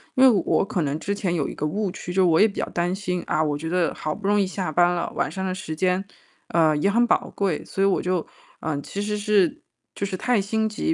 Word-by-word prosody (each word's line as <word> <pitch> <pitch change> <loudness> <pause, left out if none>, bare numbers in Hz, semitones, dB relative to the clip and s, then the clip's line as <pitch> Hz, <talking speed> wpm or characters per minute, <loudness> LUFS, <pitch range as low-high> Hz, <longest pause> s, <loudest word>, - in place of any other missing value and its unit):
因 260 - +4
为 260 - +9 0.2
我 - - +2
可 190 -4 -2
能 145 +1 -1
之 200 +4 -2
前 190 -4 -1
有 155 -5 0
一 - - -7
个 150 - -3
误 200 +5 -1
区， 180 0 -6
就 185 0 +4
我 165 -1 +4
也 215 - +7
比 205 - -6
较 - - 0
担 175 +1 -1
心， 180 -3 -3
啊， 155 - +1
我 150 -2 0
觉 160 +2 -5
得 180 0 +1
好 155 - -3
不 200 +2 -5
容 205 0 +3
易 195 - +3
下 185 -1 -3
班 175 +2 +4
了， 175 - -2
晚 145 - 0
上 190 +2 -4
的 185 - -2
时 185 -4 -5
间， 185 +3 +1 0.5
呃， 160 -2 +3
也 195 +7 +2
很 240 +3 +3
宝 - - +1
贵， 195 -6 -1
所 195 - -4
以 195 - +5
我 195 - +2
就 180 -2 -1 0.3
呃， 150 -3 -2
其 200 - -5
实 210 0 -2
是 205 -4 +2 0.3
就 200 - -2
是 190 -2 -4
太 245 +1 +2
心 220 +2 0
急。 270 +9 -1
185 Hz, 290 characters per minute, -24 LUFS, 165-200 Hz, 0.5 s, 为